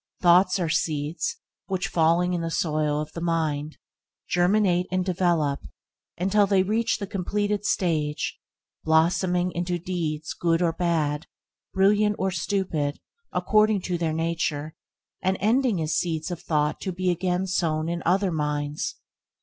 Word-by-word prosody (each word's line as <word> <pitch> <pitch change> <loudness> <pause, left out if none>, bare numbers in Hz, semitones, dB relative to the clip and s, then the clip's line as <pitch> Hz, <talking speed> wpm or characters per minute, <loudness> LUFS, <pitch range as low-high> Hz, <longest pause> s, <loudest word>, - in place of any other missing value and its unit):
Thoughts 180 +2 +5
are 175 -3 -1
seeds 155 0 -1 0.3
which, 190 -2 -1
falling 170 +2 +2
in 175 - -1
the 165 - -2
soil 155 -2 0
of 150 - -5
the 170 - -6
mind, 155 -3 -1 0.5
germinate 180 0 +2
and 185 0 0
develop 170 -6 +1 0.6
until 195 +3 +3
they 195 -1 +3
reach 225 +4 +1
the 205 - -4
completed 205 +2 -2
stage, 155 -7 0 0.4
blossoming 175 +3 +2
into 175 0 -2
deeds 160 -3 -3
good 165 -1 +1
or 170 -2 +1
bad, 160 -3 0 0.5
brilliant 205 +2 +3
or 190 0 0
stupid, 170 -5 -1 0.3
according 215 -2 +3
to 175 -2 -2
their 165 -2 0
nature, 160 -2 -2 0.5
and 190 +1 +1
ending 230 -1 +2
as 155 0 -1
seeds 165 0 -1
of 175 - -5
thought 150 -1 0
to 190 - -2
be 185 0 0
again 180 +1 0
sown 160 -4 0
in 170 0 -2
other 190 +2 +2
minds. 150 -1 -2
175 Hz, 140 wpm, -25 LUFS, 160-190 Hz, 0.6 s, Thoughts